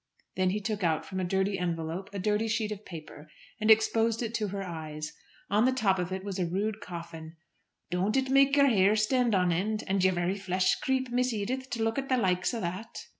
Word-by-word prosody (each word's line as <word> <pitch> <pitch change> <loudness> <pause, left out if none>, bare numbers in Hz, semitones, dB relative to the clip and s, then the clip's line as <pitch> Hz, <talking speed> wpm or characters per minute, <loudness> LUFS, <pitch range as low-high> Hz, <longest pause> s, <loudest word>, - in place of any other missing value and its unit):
Then 185 -1 +2
he 205 +3 -1
took 210 -1 -3
out 160 -2 +1
from 190 - -5
a - - -1
dirty 190 +2 0
envelope 170 +2 -3
a 200 - -6
dirty 210 +3 0
sheet 215 -1 -1
of 210 0 -6
paper, 155 -2 -10 0.3
and 215 0 0
exposed 225 +1 +4
it 225 -1 -4
to 215 -3 -1
her 195 0 -4
eyes. 155 -3 -6 0.4
On 210 +3 +4
the 260 - +4
top 205 -7 +1
of 180 0 -2
it 190 0 -3
was 195 -1 -4
a 180 - +1
rude 205 +4 -2
coffin. 170 -3 -8 0.6
"Don't 190 +7 +1
it 265 0 0
make 275 +1 +5
yer 280 -1 +6
hair 205 -5 +4
stand 230 +1 +2
on 180 -2 +3
end, 210 +6 -1
and 195 -1 0
yer 190 - +5
very 180 +3 -1
flesh 185 -1 +1
creep, 260 -1 -1
Miss 250 +1 +1
Edith, 255 +5 -3
to 235 -3 -2
look 225 +4 0
at 270 - -5
the 260 - +3
likes 180 -5 +1
o' 235 - -3
that!" 185 +6 -5
200 Hz, 225 wpm, -29 LUFS, 180-225 Hz, 0.6 s, yer